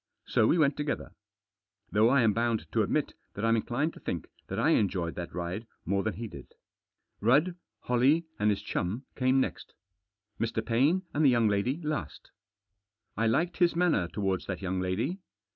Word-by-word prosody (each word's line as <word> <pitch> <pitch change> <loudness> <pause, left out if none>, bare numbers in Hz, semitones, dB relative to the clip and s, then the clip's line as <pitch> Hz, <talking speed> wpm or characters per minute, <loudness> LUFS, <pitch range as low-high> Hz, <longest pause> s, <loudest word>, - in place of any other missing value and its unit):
So 110 - +3
we - - +3
went 150 -3 +3
together. 150 -1 -3 0.8
Though 110 +2 +4
I 135 +1 +4
am 110 -2 +4
bound 115 0 0
to - - +2
admit - - 0 0.2
that 105 - -2
I'm 115 0 +4
inclined 130 +8 -1
to - - -13
think - - -4 0.2
that - - -4
I - - +3
enjoyed 90 -5 +1
that 85 -1 -6
ride 90 +6 -4 0.2
more 100 +3 +1
than 110 -2 -2
he 115 +4 -5
did. - - -12 0.6
Rudd, 145 - +3 0.3
Holley, 135 +7 +3
and 105 +1 +3
his 100 -1 0
chum 105 +10 -2
came 130 0 +3
next. - - -3 0.7
Mr. 115 0 -1
Paine 140 +11 +2
and 150 - +1
the 140 - +7
young 120 -3 +3
lady 105 +9 0
last. 155 0 -4 0.8
I 115 +1 +1
liked 165 +10 +1
his 175 -2 +3
manner 170 - +2
towards 95 -1 -2
that 95 0 -4
young 95 0 -1
lady. 110 - -1
115 Hz, 175 wpm, -29 LUFS, 100-145 Hz, 0.8 s, the